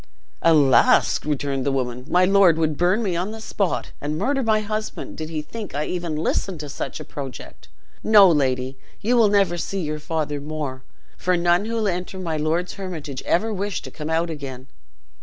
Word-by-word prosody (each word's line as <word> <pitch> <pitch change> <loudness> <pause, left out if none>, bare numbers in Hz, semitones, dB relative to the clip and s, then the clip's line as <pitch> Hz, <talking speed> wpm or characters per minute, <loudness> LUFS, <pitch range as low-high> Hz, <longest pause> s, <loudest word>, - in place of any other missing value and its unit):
"Alas!" 150 -5 +5
returned 140 -2 -1
the 140 - +1
woman, 125 -2 -2
"my 180 +1 +4
lord 190 -4 +5
would 155 -2 +1
burn 180 +8 +2
me 185 -5 -1
on 180 +4 -1
the 220 +1 -7
spot, 200 -4 -2
and 150 +2 -2
murder 270 - 0
my 220 -3 +2
husband, 215 +1 -4
did 155 0 -5
he 155 -2 -3
think 215 0 -7
I 150 +1 -1
even 175 -3 -3
listened 165 +3 -1
to 150 - -7
such 145 - -5
a - - -8
project. 135 -3 -8 0.4
No, 210 -3 +8
lady; 130 -4 +1 0.2
you 235 +4 +1
never 200 -3 +3
will - - -3
see 195 +3 -3
your 155 -1 -3
father 150 -2 -2
more; 145 -3 -4 0.4
for 180 0 +1
none 175 +3 +2
who 225 -1 -1
enter 180 0 -2
my 170 -4 -3
lord's 160 +4 -1
Hermitage 160 -9 -6
ever 220 +5 +1
wish 200 0 -3
to - - -8
come 150 0 -6
out 165 +1 0
again." 135 -4 -7
165 Hz, 190 wpm, -23 LUFS, 150-195 Hz, 0.4 s, No